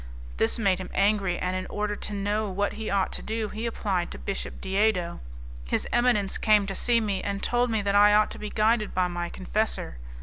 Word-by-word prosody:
This 110 Hz, -, +1 dB
made 195 Hz, -5 st, +2 dB
him 185 Hz, -, -6 dB
angry, 200 Hz, -3 st, +2 dB
and, 185 Hz, 0 st, -2 dB
in 185 Hz, -, -3 dB
order 210 Hz, 0 st, -2 dB
to 210 Hz, -, -5 dB
know 205 Hz, +1 st, -1 dB
what 200 Hz, +2 st, -1 dB
he 220 Hz, 0 st, -5 dB
ought 195 Hz, -1 st, +1 dB
to -, -, -4 dB
do, 220 Hz, -1 st, -3 dB
he 225 Hz, +2 st, -4 dB
applied 195 Hz, -6 st, -1 dB
to -, -, -8 dB
Bishop 195 Hz, -, -5 dB
Diedo. 190 Hz, -3 st, 0 dB, 0.5 s
His -, -, -1 dB
eminence 240 Hz, -5 st, +2 dB
came 210 Hz, -2 st, +4 dB
to 195 Hz, -, -4 dB
see 235 Hz, +4 st, +2 dB
me, 205 Hz, -4 st, -1 dB
and 200 Hz, 0 st, -3 dB
told 245 Hz, 0 st, +2 dB
me 220 Hz, -2 st, 0 dB
that 200 Hz, 0 st, 0 dB
I 205 Hz, +1 st, +6 dB
ought 215 Hz, 0 st, +3 dB
to -, -, -8 dB
be 210 Hz, -, -5 dB
guided 215 Hz, 0 st, +1 dB
by 180 Hz, -1 st, +2 dB
my 175 Hz, -1 st, -3 dB
confessor. 195 Hz, -, -2 dB
205 Hz, 215 wpm, -27 LUFS, 190-215 Hz, 0.5 s, I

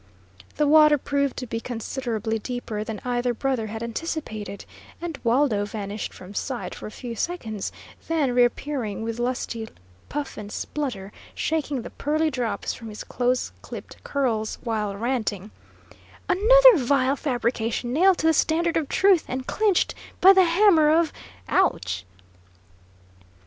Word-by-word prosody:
The 300 Hz, -, +2 dB
water 300 Hz, 0 st, +7 dB
proved 280 Hz, 0 st, -1 dB
to 255 Hz, -, -4 dB
be 230 Hz, -1 st, -3 dB
considerably 230 Hz, -2 st, -3 dB
deeper 225 Hz, -2 st, -4 dB
than 220 Hz, -1 st, -5 dB
either 245 Hz, 0 st, 0 dB
brother 255 Hz, -3 st, -1 dB
had 220 Hz, +2 st, -5 dB
anticipated, 230 Hz, -5 st, -5 dB, 0.3 s
and 335 Hz, -4 st, -5 dB
Waldo 235 Hz, -3 st, +2 dB
vanished 205 Hz, 0 st, -5 dB
from 185 Hz, +2 st, -11 dB
sight 250 Hz, +4 st, -4 dB
for -, -, -8 dB
a -, -, -9 dB
few 235 Hz, +1 st, -7 dB
seconds, 225 Hz, -, -3 dB, 0.4 s
then 305 Hz, -6 st, +1 dB
reappearing 245 Hz, -3 st, 0 dB
with 230 Hz, +1 st, -4 dB
lusty 240 Hz, -2 st, -2 dB, 0.4 s
puff 290 Hz, -2 st, -4 dB
and 205 Hz, -1 st, -7 dB
splutter, 215 Hz, -11 st, -4 dB, 0.2 s
shaking 295 Hz, -5 st, -1 dB
the -, -, -8 dB
pearly 310 Hz, +2 st, 0 dB
drops 245 Hz, -4 st, -2 dB
from 230 Hz, -, -9 dB
his 210 Hz, -, -7 dB
close 250 Hz, 0 st, 0 dB
clipped -, -, -10 dB
curls, 230 Hz, -6 st, -1 dB
while 215 Hz, -4 st, -2 dB
ranting: 220 Hz, -4 st, -2 dB, 0.8 s
"Another -, -, +7 dB
vile 270 Hz, 0 st, +2 dB
fabrication 240 Hz, -3 st, -1 dB
nailed 365 Hz, +5 st, +5 dB
to -, -, -2 dB
the 320 Hz, -, +5 dB
standard 330 Hz, +2 st, +2 dB
of 310 Hz, -4 st, -1 dB
truth, 385 Hz, -4 st, +4 dB
and 255 Hz, 0 st, -4 dB
clinched 415 Hz, 0 st, +1 dB, 0.3 s
by 385 Hz, +1 st, +9 dB
the 380 Hz, -1 st, +6 dB
hammer 335 Hz, -3 st, +5 dB
of 320 Hz, 0 st, +3 dB, 0.3 s
ouch!" 90 Hz, -, 0 dB
250 Hz, 140 wpm, -24 LUFS, 225-310 Hz, 0.8 s, by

